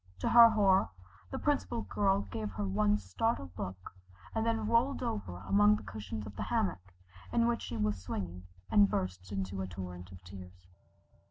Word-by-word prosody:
To - - +1
her 235 -1 +9
horror, 195 -4 +3 0.4
the - - -4
Principal 260 -5 0
Girl 195 -1 +1
gave 110 -2 -3
her 100 +1 -3
one 105 +2 +2
startled 95 - -2
look, 95 -1 -6 0.4
and 225 - 0
then 225 -1 0
rolled 235 +5 +2
over 95 - -4
among 105 +2 +5
the 105 - -7
cushions 105 +1 -6
of 100 -1 -9
the - - -4
hammock 90 0 -1 0.4
in 235 - +3
which 235 0 0
she 115 - -5
was 105 -3 -1
swinging, 90 -1 -5 0.2
and 205 -1 +6
burst 90 +1 -3
into 95 -1 -3
a 95 - -3
torrent 90 -1 -8
of 95 0 -13
tears. 90 -1 -12
100 Hz, 175 wpm, -32 LUFS, -, 0.4 s, her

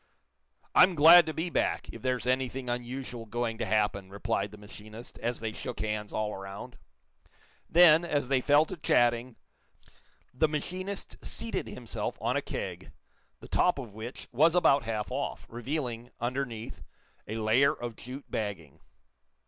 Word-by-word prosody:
"I'm 185 -1 +6
glad 165 +3 +9
to - - -1
be 165 +3 -2
back, - - 0
if 115 - -10
there's 125 -1 -1
anything 130 0 -1
unusual 120 -1 -5
going 115 0 -2
to - - -2
happen," 105 -2 0
replied 100 0 -2
the 105 - -12
machinist, 110 +2 -11
as 120 0 -2
they 110 -1 -3
shook 125 0 -6
hands 105 -1 -3
all 105 -1 -2
around. 95 0 -8 0.9
Then, 170 -1 +7
as 145 -6 -1
they 130 -1 +2
fell 145 +3 +5
to 185 +3 -7
chatting, 120 -4 +2 1.0
the 140 +5 +3
machinist 185 +6 -5
seated 230 0 -3
himself - - -4
on - - 0
a - - +1
keg, - - -6 0.5
the - - -10
top 180 - +2
of 120 -7 -7
which 110 +4 -8
was 160 +7 +4
about 140 -7 +4
half 110 0 -3
off, 140 +2 -3
revealing, 120 -1 -4
underneath, 120 -2 -4 0.5
a 110 - -4
layer 115 +6 +4
of 120 -6 -6
jute 130 +5 -9
bagging. 100 -9 -5
120 Hz, 150 wpm, -29 LUFS, 110-145 Hz, 1.0 s, glad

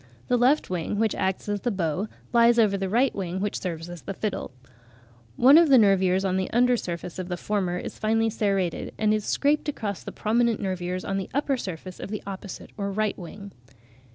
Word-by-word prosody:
The 250 - +4
left 260 +5 +3
wing, 180 +3 -2
which 220 0 +2
acts 190 +1 -2
as 205 -1 -2
the 245 - 0
bow, 185 -1 -1 0.3
lies 235 0 +5
over 215 -4 +4
the 195 -1 -2
right 245 +6 +2
wing 185 -2 -3
which 205 +1 -2
serves 165 -2 -4
as 175 -2 -8
the 195 - -6
fiddle. 210 -1 -3 0.9
One 275 - +7
of 335 -3 +4
the 265 - +8
nervures 190 -3 +4
(a) - - +3
on 185 0 0
the 190 - -1
under 245 +1 +3
surface 175 -4 -5
of 185 - -4
the 180 -1 -3
former 185 -3 -1
is - - -7
finely 225 +1 +1
serrated, 195 -5 -1
and 215 -1 +2
is 215 -1 -1
scraped 295 +1 +1
across 210 -9 -4
the - - -6
prominent 230 +1 +1
nervures 185 -2 -3
on 195 0 -1
the 190 - -5
upper 285 -1 +1
surface 185 -5 -7
of - - -6
the 210 0 -5
opposite 195 0 -8
or 200 -1 -2
right 215 +1 0
wing. 200 +3 -9
200 Hz, 210 wpm, -26 LUFS, 185-225 Hz, 0.9 s, the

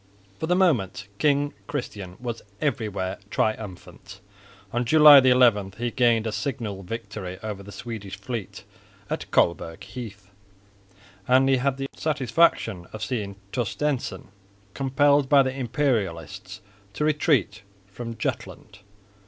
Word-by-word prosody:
For 160 - -2
the 180 - +3
moment 110 - +1
King 145 -1 +2
Christian 100 -9 -5
was 120 -2 -5 0.2
everywhere 105 -10 -2
triumphant. 105 -3 -4 0.5
On 120 +1 +1
July 150 +2 +9
11 120 -7 +4
he 120 +1 -2
gained 120 -3 +3
a 110 - -1
signal 110 -6 -4
victory 100 -2 -6
over 105 -2 -5
the 100 +1 -11
Swedish 105 -4 -7
fleet 105 0 -6 0.5
at - - -3
Colberg 85 -1 +1
Heath, 105 -6 -9 1.0
and 130 +1 +5
he 135 -1 +4
had 135 +1 0
the 135 - -3
satisfaction 130 - +1
of 110 0 -6
seeing 105 -6 -3 0.2
Torstensson 130 +2 -2 0.4
compelled 140 +1 +2
by 140 -2 +6
the 130 0 -3
Imperialists 115 - -2 0.3
to 150 - -1
retreat 145 - +1 0.2
from 115 +4 -8
Jutland. - - -5
120 Hz, 120 wpm, -25 LUFS, 100-135 Hz, 1.0 s, July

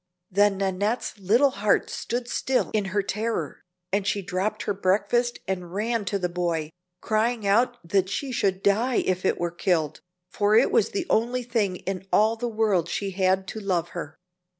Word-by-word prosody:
Then 200 +1 +3
Nannette's 200 +3 -1
little 235 +9 +4
heart 205 -2 +1
stood 240 +1 -3
still 260 +1 0
in 210 -2 +1
her 195 +1 0
terror, 210 -7 -3 0.3
and 200 0 +1
she 200 -1 0
dropped 185 +4 -2
her 205 - -1
breakfast 210 +5 +1
and 180 -2 -4
ran 225 +1 -1
to 200 +2 0
the 180 -2 -1
boy, 170 -3 -2 0.3
crying 220 0 0
out 235 +5 +3
that 190 +1 +2
she 270 +6 -3
should 195 -5 0
die 225 +5 +2
if 185 0 -1
it - - +1
were 175 -1 -1
killed, 175 -3 0 0.3
for 205 +1 +1
it 230 - +5
was - - +3
the 385 -4 -2
only 245 +3 +1
thing 225 -6 0
in 190 +1 -5
all 220 +2 +4
the 240 +1 -3
world 210 -6 +1
she 200 -1 -2
had 190 0 +1
to 220 - -5
love 180 -4 -1
her. 160 -3 -7
200 Hz, 180 wpm, -25 LUFS, 185-225 Hz, 0.3 s, it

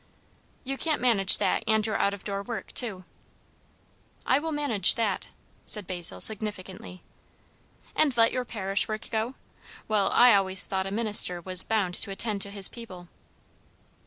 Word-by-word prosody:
"You 270 +1 -6
can't 315 -2 -1
manage 215 -6 +5
that - - -2
and 220 -1 0
your 220 - -4
out 200 0 -2
door 200 -1 -6
work 225 +2 -9
too." 200 -7 -1 1.2
"I 260 - +1
will 320 +2 -6
manage 275 - +2
that" 220 -5 -4 0.4
said 210 -3 -1
Basil 175 -2 0
significantly. 195 -4 +1 0.9
"And 280 -6 0
let 230 0 +2
your 255 - -4
parish 200 -4 -3
work 215 0 -8
go? 225 +3 -4 0.5
Well, 210 -2 -1
I 245 -1 +4
always 190 -1 +2
thought 190 0 -4
a - - -8
minister 205 -4 +1
was 185 +1 +6
bound 205 -5 -3
to 200 - 0
attend 200 +1 0
to 200 - +1
his 200 -1 +2
people." 185 -7 -13
210 Hz, 155 wpm, -24 LUFS, 190-230 Hz, 1.2 s, was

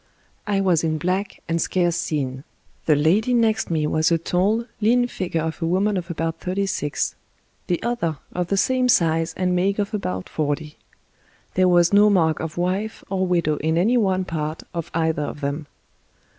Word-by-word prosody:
I 200 -1 +1
was 180 -5 +2
in 155 -1 0
black 185 +5 -2
and 165 0 0
scarce 175 -1 +1
seen. 135 -5 -2 0.4
The 155 - +5
lady 195 - +2
next 225 -2 +2
me 160 -3 0
was 155 +2 +1
a 165 - +4
tall, 195 +7 0 0.2
lean 245 +3 +4
figure 170 -8 -3
of 160 +1 -4
a 165 - 0
woman 195 +4 +1
of 180 -1 -3
about 165 -1 -3
thirty 190 +2 -1
six; 150 -6 -2 0.5
the 175 - 0
other, 225 -10 -1 0.2
of 180 -1 -1
the 195 - 0
same 255 +5 +2
size 165 -4 +2
and 180 -1 +1
make 195 +3 +1
of 205 +1 -2
about 95 - -3
forty. 150 0 -3 0.8
There 185 0 +3
was 175 0 +4
no 205 +1 +6
mark 165 -6 +2
of 160 0 -5
wife 190 +5 -2
or 190 -1 0
widow 170 -4 +1
in 160 +2 0
any 215 +8 +3
one 190 -5 +2
part 155 -2 -4
of 170 -2 -4
either 160 -2 +1
of 145 0 -5
them. 145 +2 -3
175 Hz, 185 wpm, -22 LUFS, 160-195 Hz, 0.8 s, no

